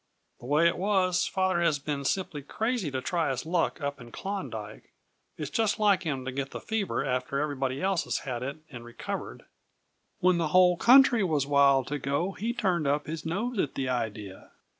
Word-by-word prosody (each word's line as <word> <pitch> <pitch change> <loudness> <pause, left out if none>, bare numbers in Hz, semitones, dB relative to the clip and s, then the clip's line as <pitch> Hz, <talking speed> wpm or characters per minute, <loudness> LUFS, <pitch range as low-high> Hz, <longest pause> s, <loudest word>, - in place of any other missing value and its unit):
The 120 - -10
way 150 +4 +4
it 170 - 0
was, 185 -2 +2
father 185 -2 0
has 165 -4 +2
been 140 -1 -4
simply 160 -2 -1
crazy 220 - -2
to 130 -1 -3
try 165 +1 0
his 130 +1 -3
luck 170 0 0
up 140 -1 -3
in 120 -1 -12
Klondyke; 115 - -6 0.5
it's 150 -2 -5
just 220 -3 +1
like 205 -3 +3
him 140 -7 -3
to 130 - -3
get 135 +1 -3
the - - -7
fever 220 -3 -2
after 130 +1 -1
everybody 135 -1 -2
else 190 -2 +1
has - - -1
had 125 -3 -3
it 140 +4 -4
and 120 -3 -9
recovered. 120 0 -6 0.7
When 180 -1 +3
the 165 - +1
whole 180 +2 +5
country 245 +1 +6
was 155 -6 +1
wild 140 -2 +4
to 145 0 -2
go 140 +8 -1
he 215 +5 -3
turned 185 -10 0
up 145 +1 +1
his 160 +1 -5
nose 210 +7 -2
at 145 - -1
the 130 -1 -2
idea. 105 -5 -4
150 Hz, 195 wpm, -28 LUFS, 135-185 Hz, 0.7 s, country